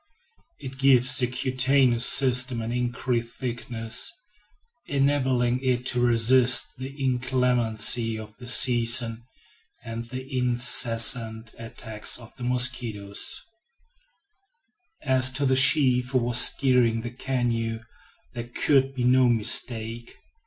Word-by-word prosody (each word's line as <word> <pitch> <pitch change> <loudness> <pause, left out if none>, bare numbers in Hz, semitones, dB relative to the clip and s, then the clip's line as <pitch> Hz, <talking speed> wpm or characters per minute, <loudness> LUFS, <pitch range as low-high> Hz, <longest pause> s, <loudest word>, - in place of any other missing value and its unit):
It 135 -1 -10
gives 130 -1 +3
the 125 - 0
cutaneous 130 -1 +1
system 125 -2 +1
an 115 +1 -5
increased 120 -1 -3
thickness, 120 - -4 0.8
enabling 130 -3 0
it 125 -1 -1
to 125 - -2
resist 120 +1 +3
the 130 +1 -7
inclemency 125 -4 -1
of 110 0 -11
the 125 - -12
season 120 -2 +2 0.6
and 115 +1 -7
the 130 +2 -8
incessant 115 -2 0
attacks 110 -2 -7
of 115 -2 -15
the 125 - -10
mosquito. 120 -5 -1 1.9
As 130 -2 +2
to 140 +1 -2
the 130 -1 +1
chief 130 -2 +4
who 130 - 0
was 120 0 +3
steering 125 -5 +3
the 120 +1 -7
canoe, 120 -3 -3 0.5
there 120 0 -7
could 135 0 0
be 125 - -3
no 125 0 +3
mistake. 115 0 -1
125 Hz, 110 wpm, -24 LUFS, 115-130 Hz, 1.9 s, chief